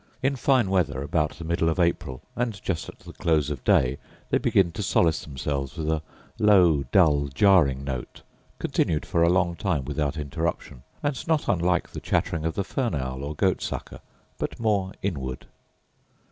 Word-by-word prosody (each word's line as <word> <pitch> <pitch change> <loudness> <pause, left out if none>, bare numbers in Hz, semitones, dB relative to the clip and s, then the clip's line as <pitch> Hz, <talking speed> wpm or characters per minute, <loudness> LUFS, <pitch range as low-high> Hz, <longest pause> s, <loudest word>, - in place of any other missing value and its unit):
In 135 +1 +2
fine 130 -6 +2
weather, 70 -8 +1
about 75 +1 0
the 85 - -9
middle 80 0 +1
of 80 - -1
April, 85 -6 0
and 115 -5 -2
just 85 -4 -2
at - - -12
the - - -11
close 75 -3 +1
of 70 -4 -5
day, 65 +2 +3 0.3
they - - +3
begin 90 -3 +3
to 105 - -5
solace 85 -4 +2
themselves 70 -1 -4
with 80 -1 -3
a 80 -1 0 0.4
low, 90 -9 +5
dull, 75 -7 +4
jarring 70 -3 +4
note, 65 -3 -6 0.3
continued 75 -2 0
for 85 - 0
a 85 - +5
long 90 -1 +2
time 85 -8 -1
without 75 +1 -2
interruption, 75 -3 -3 0.2
and 145 -3 -2
not 160 -2 +1
unlike 90 -1 +1
the - - -6
chattering 85 -3 -1
of 80 - -1
the 100 - 0
fern 120 - -2
owl, 65 -1 -4
or 75 +2 -4
goat - - +1
sucker, - - -5 0.4
but - - -4
more 100 -4 +1
inward. 65 -10 -3
80 Hz, 175 wpm, -25 LUFS, 70-95 Hz, 0.4 s, low